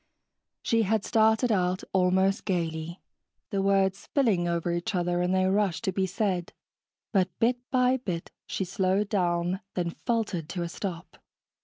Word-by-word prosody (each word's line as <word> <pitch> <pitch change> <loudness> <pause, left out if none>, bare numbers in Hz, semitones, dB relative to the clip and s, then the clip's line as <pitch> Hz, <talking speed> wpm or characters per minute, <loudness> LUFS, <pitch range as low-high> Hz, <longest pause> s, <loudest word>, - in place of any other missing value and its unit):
She 230 -2 +2
had 215 0 +1
started 220 +1 +3
out 185 -2 +1
almost 190 +1 +2
gaily, 165 -1 -3 0.5
the 195 - 0
words 195 0 +2
spilling 215 -11 +1
over 170 0 0
each 175 +5 -2
other 175 0 +1
in 180 +1 +1
their 185 0 +2
rush 200 -3 +1
to 205 -4 -1
be 190 0 0
said, 185 -2 -1 0.6
but 190 -3 +2
bit 240 +2 +2
by 255 0 +3
bit 180 -9 -5 0.2
she 190 - -2
slowed 190 +2 0
down, 175 -2 0 0.2
then 175 -2 -1
faltered 205 -7 -2
to 175 -3 -3
a 170 - -4
stop. 180 -1 -6
190 Hz, 155 wpm, -27 LUFS, 175-210 Hz, 0.6 s, started